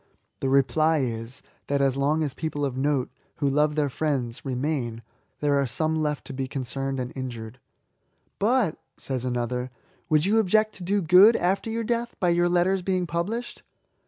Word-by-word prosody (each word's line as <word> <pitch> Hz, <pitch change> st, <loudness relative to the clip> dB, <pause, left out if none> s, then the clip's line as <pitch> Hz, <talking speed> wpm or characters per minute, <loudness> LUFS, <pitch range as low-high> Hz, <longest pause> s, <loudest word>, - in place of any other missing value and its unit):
The 135 Hz, -, -1 dB
reply 155 Hz, +4 st, +3 dB
is, 115 Hz, +1 st, -4 dB, 0.2 s
that 140 Hz, 0 st, +1 dB
as 135 Hz, -2 st, +2 dB
long 145 Hz, +3 st, +1 dB
as 145 Hz, -3 st, -2 dB
people 145 Hz, -3 st, -3 dB
of 135 Hz, -2 st, -3 dB
note, 135 Hz, -1 st, 0 dB, 0.2 s
who 140 Hz, -, -1 dB
love 150 Hz, +2 st, +2 dB
their 150 Hz, -2 st, +2 dB
friends, 130 Hz, -4 st, -2 dB
remain, 130 Hz, -3 st, -2 dB, 0.4 s
there 145 Hz, -1 st, +2 dB
are 135 Hz, -, 0 dB
some 155 Hz, +6 st, -1 dB
left 150 Hz, -2 st, -1 dB
to -, -, -7 dB
be 130 Hz, 0 st, -3 dB
concerned 135 Hz, +1 st, -3 dB
and 125 Hz, 0 st, -4 dB
injured. 120 Hz, -2 st, -6 dB, 0.4 s
'* -, -, -45 dB
But, 245 Hz, -10 st, +1 dB, 0.2 s
says 130 Hz, -2 st, -3 dB
another, 125 Hz, 0 st, -2 dB, 0.2 s
" -, -, -37 dB
woidd 155 Hz, +1 st, +4 dB
you 215 Hz, +3 st, +3 dB
object 215 Hz, +1 st, +2 dB
to 185 Hz, -, -9 dB
do 200 Hz, +2 st, +1 dB
good, 185 Hz, +7 st, +7 dB
after 190 Hz, +5 st, 0 dB
your 230 Hz, +1 st, -2 dB
death, 235 Hz, +1 st, -2 dB
by 180 Hz, -, +2 dB
your 175 Hz, 0 st, +3 dB
letters 180 Hz, +2 st, +2 dB
being 185 Hz, -1 st, 0 dB
published?" 195 Hz, +9 st, -3 dB
150 Hz, 185 wpm, -25 LUFS, 130-175 Hz, 0.4 s, good